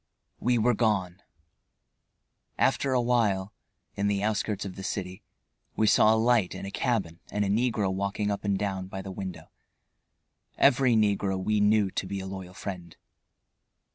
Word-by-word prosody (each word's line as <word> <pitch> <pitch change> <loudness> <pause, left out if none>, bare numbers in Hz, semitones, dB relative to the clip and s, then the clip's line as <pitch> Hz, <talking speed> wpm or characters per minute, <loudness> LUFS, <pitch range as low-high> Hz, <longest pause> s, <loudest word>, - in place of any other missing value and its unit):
We 120 0 +2
were 120 +2 +3
gone. 100 -5 0 1.4
After 135 - +2
a 130 - +3
while, 110 -5 +1 0.4
in 100 0 -1
the 100 -1 0
outskirts 105 -1 -1
of 95 - -6
the 95 - -8
city, 95 -1 -4 0.5
we 110 - +2
saw 110 +1 +5
a - - +1
light 115 -4 +2
in - - -6
a 100 - -6
cabin 95 -10 -1
and 105 0 -1
a - - -1
negro 105 -3 +1
walking 100 +2 -1
up 100 - -3
and 100 -2 +1
down 95 -2 -3
by 95 0 -6
the 95 - -7
window. 95 -1 -7 1.1
Every 130 -3 +4
negro 100 -3 +1
we 105 +3 0
knew 105 -1 +3
to 95 - -3
be 100 0 -4
a 95 - -6
loyal 95 -1 -7
friend. 90 -3 -7
100 Hz, 165 wpm, -27 LUFS, 95-110 Hz, 1.4 s, saw